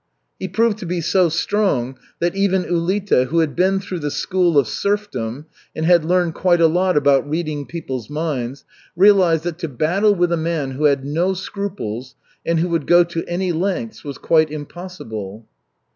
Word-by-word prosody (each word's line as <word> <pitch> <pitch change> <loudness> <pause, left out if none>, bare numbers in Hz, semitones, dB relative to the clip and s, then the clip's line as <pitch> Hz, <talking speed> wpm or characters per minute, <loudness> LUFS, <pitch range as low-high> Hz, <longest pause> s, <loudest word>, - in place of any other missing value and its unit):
He 190 - -3
proved 220 +3 +1
to 180 - -6
be 175 +1 -1
so 175 +1 +2
strong 155 - 0 0.2
that 175 0 0
eyen 195 -2 +1
Ulita, 175 -4 +1
who 165 - -2
had 160 -3 +1
been 190 +2 +2
through 185 -2 -5
the 145 -2 -2
school 175 +1 +1
of 140 -5 +4
serfdom 150 - -2 0.3
and 160 - -2
had 170 -1 +5
learned 175 0 +1
quite 175 0 +2
a 165 - +5
lot 180 +2 +2
about 140 0 +3
reading 155 -3 -3
people's 130 -8 -6
minds, 145 -4 -3 0.3
realized 180 -4 +5
that 175 -1 -4
to 170 - -3
battle 180 - +1
with 175 -1 +1
a 170 - +2
man 160 -4 -2
who 140 +4 -2
had 140 -2 +2
no 170 +6 0
scruples 155 - -5 0.3
and 165 0 0
who 175 +2 0
would 165 -4 -1
go 175 0 +6
to 170 -1 -4
any 180 +1 -1
lengths 195 +6 -3
was 140 -3 -6
quite 160 -2 +2
impossible. 145 - -8
170 Hz, 180 wpm, -20 LUFS, 145-185 Hz, 0.3 s, go